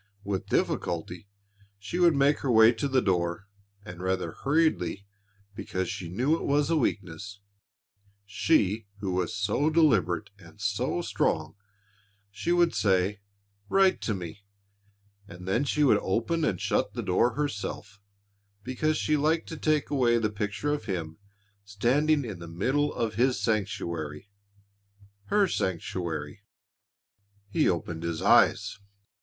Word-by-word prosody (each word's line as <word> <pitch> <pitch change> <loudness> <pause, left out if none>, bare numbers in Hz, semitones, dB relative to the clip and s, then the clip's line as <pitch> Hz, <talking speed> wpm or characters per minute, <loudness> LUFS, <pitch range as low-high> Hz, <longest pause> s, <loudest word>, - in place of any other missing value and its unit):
With 100 -2 -3
difficulty, 85 +3 -2 0.5
she 100 - -5
would 170 -3 +5
make 140 +1 +3
her 135 - -3
way 110 0 +7
to 120 +4 -2
the 130 -2 +2
door 90 0 -1 0.4
and 90 0 -9
rather 95 0 -1
hurriedly, 135 - 0 0.5
because 95 -2 -3
she 85 - -6
knew 125 - +1
it - - -5
was 145 +2 +1
a - - +3
weakness 100 - -2 0.9
she 105 - +1
who 100 -2 -3
was 90 +2 -1
so 110 +8 +1
deliberate 155 - +2
and - - -16
so - - -1
strong - - -1 0.8
she 105 +12 -2
would 175 -1 +3
say, 95 0 +1 0.5
"Write 195 -1 +3
to 110 - -1
me," 90 +1 -7 0.9
and 90 -1 -11
then 115 +9 +1
she 150 +1 +1
would 115 -7 +5
open 120 - 0
and 90 - -1
shut - - 0
the - - -3
door 115 +6 +2
herself 105 -7 -4 0.6
because 155 +6 0
she 155 - +1
liked 155 +3 +1
to 160 - -5
take 155 -1 0
away 125 -4 +3
the 110 -2 0
picture 105 +8 -2
of 145 -7 -4
him 85 -6 -4 0.4
standing 130 +8 +1
in 105 -6 -6
the 85 - -8
middle 130 - 0
of 115 -3 -2
his 125 +3 +2
sanctuary 90 -6 -3 0.9
her 205 -1 +3
sanctuary.... 85 - -3 1.1
He 100 - +2
opened 80 -1 -3
his 85 -1 -3
eyes. - - +4
105 Hz, 140 wpm, -27 LUFS, 95-145 Hz, 1.1 s, way